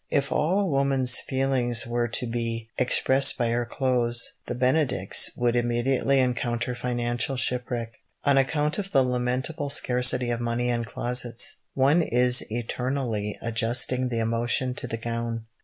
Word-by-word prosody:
If 140 Hz, -1 st, -1 dB
all 165 Hz, +6 st, +1 dB
a -, -, 0 dB
woman's 135 Hz, -5 st, +1 dB
feelings 130 Hz, -3 st, 0 dB
were 120 Hz, 0 st, -1 dB
to 120 Hz, +2 st, -2 dB
be 115 Hz, -1 st, -4 dB
expressed 130 Hz, +2 st, +3 dB
by 120 Hz, -2 st, 0 dB
her 120 Hz, 0 st, -1 dB
clothes, 120 Hz, -3 st, 0 dB
the -, -, -4 dB
benedicts 130 Hz, +3 st, +2 dB
would 120 Hz, 0 st, +1 dB
immediately 120 Hz, +3 st, +1 dB
encounter 125 Hz, -1 st, -1 dB
financial 120 Hz, +1 st, -1 dB
shipwreck. 125 Hz, -2 st, 0 dB, 0.3 s
On 140 Hz, -1 st, +3 dB
account 150 Hz, +5 st, 0 dB
of 195 Hz, -1 st, -5 dB
the 135 Hz, -, +4 dB
lamentable 125 Hz, +4 st, -2 dB
scarcity 125 Hz, -2 st, +2 dB
of 120 Hz, -, -2 dB
money 120 Hz, +1 st, -2 dB
and 120 Hz, -1 st, -2 dB
closets, 120 Hz, -1 st, +1 dB, 0.2 s
one 140 Hz, +6 st, +3 dB
is 125 Hz, -3 st, +4 dB
eternally 120 Hz, -2 st, -3 dB
adjusting 120 Hz, +2 st, +1 dB
the 120 Hz, -, -3 dB
emotion 115 Hz, +3 st, 0 dB
to 125 Hz, -, -7 dB
the 115 Hz, -, -4 dB
gown. 115 Hz, 0 st, -4 dB
125 Hz, 145 wpm, -25 LUFS, 120-130 Hz, 0.3 s, the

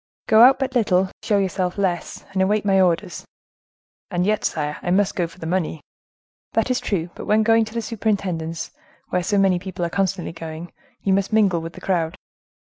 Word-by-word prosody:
"Go 220 Hz, -1 st, +5 dB
out 260 Hz, +2 st, +8 dB
but 265 Hz, -1 st, -2 dB
little, 190 Hz, -6 st, +2 dB
show 205 Hz, -, +1 dB
yourself 185 Hz, -1 st, -1 dB
less, 180 Hz, -4 st, -2 dB
and 190 Hz, -, +1 dB
await 205 Hz, +2 st, +1 dB
my 195 Hz, -1 st, +4 dB
orders." 180 Hz, -2 st, 0 dB, 0.9 s
"And 175 Hz, 0 st, 0 dB
yet, 210 Hz, +1 st, +1 dB
sire, 150 Hz, -1 st, -2 dB
I -, -, -3 dB
must 195 Hz, +2 st, +2 dB
go 175 Hz, -2 st, 0 dB
for 165 Hz, -, -17 dB
the 165 Hz, -, -8 dB
money." 165 Hz, -2 st, -1 dB, 0.7 s
"That 225 Hz, +3 st, +1 dB
is 250 Hz, -, +1 dB
true, 175 Hz, -4 st, -2 dB
but -, -, -8 dB
when 215 Hz, +1 st, +3 dB
going 225 Hz, 0 st, +4 dB
to 220 Hz, -, -11 dB
the 230 Hz, -, -1 dB
superintendence, 195 Hz, -8 st, -2 dB, 0.4 s
where 180 Hz, -, 0 dB
so 200 Hz, +4 st, 0 dB
many 190 Hz, -2 st, +3 dB
people 185 Hz, -1 st, -4 dB
are 170 Hz, -, -4 dB
constantly 190 Hz, -2 st, -1 dB
going, 165 Hz, 0 st, -8 dB, 0.3 s
you 195 Hz, -, +2 dB
must 195 Hz, +1 st, 0 dB
mingle 200 Hz, -6 st, +3 dB
with 165 Hz, +1 st, -7 dB
the -, -, -12 dB
crowd." 170 Hz, -2 st, 0 dB
190 Hz, 200 wpm, -22 LUFS, 175-210 Hz, 0.9 s, out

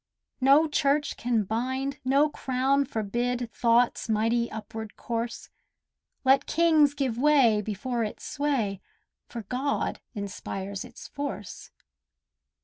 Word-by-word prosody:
No 280 Hz, +5 st, +6 dB
church 295 Hz, 0 st, +1 dB
can 230 Hz, -2 st, 0 dB
bind, 260 Hz, +6 st, -2 dB
no 275 Hz, +3 st, +4 dB
crown 270 Hz, 0 st, 0 dB
forbid 240 Hz, 0 st, -2 dB
Thought's 235 Hz, 0 st, +2 dB
mighty 230 Hz, +2 st, +1 dB
upward 220 Hz, 0 st, -7 dB
course— 235 Hz, 0 st, -4 dB, 0.7 s
Let 270 Hz, +1 st, +4 dB
kings 310 Hz, -3 st, +4 dB
give 260 Hz, -5 st, -1 dB
way 265 Hz, -7 st, +4 dB
before 225 Hz, +4 st, -2 dB
its 210 Hz, -, -6 dB
sway, 255 Hz, -10 st, -1 dB, 0.5 s
For 230 Hz, -2 st, -7 dB
God 260 Hz, +7 st, -2 dB
inspires 200 Hz, -1 st, -5 dB
its -, -, -11 dB
force. 280 Hz, -8 st, -6 dB
245 Hz, 110 wpm, -27 LUFS, 220-275 Hz, 0.7 s, No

